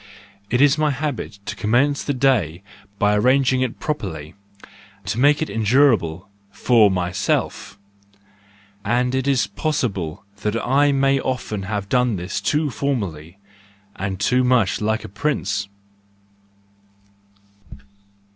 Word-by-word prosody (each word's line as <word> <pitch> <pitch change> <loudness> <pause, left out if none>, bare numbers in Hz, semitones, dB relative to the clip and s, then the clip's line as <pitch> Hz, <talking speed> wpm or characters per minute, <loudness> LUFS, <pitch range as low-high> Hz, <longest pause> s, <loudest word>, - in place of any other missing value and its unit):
it 125 +2 +1
is 145 +1 +4
my 155 -1 +2
habit 140 -7 -4
to - - -4
commence 135 +7 +1
the - - -2
day 105 - +1 0.3
by 105 +1 +2
arranging 130 +3 +3
it 130 -3 -2
properly, 90 - -4 0.7
to 115 - -2
make 145 +3 +4
it - - -4
endurable 110 - +2 0.2
for 110 +1 +4
myself 95 +2 -2 1.1
and 125 +3 0
it 130 +1 -1
is 135 -3 +2
possible 100 - -3
that 105 +1 -2
I 140 +3 +3
may 135 0 +2
often 125 -6 -3
have 100 -2 -3
done 125 0 +1
this 90 +1 -4
too 150 -1 0
formally, 95 - -3 0.6
and 95 -1 -4
too 125 +5 +2
much 125 -7 +2
like 110 +1 0
a - - -7
prince. 100 -2 -2
120 Hz, 120 wpm, -21 LUFS, 100-135 Hz, 1.1 s, is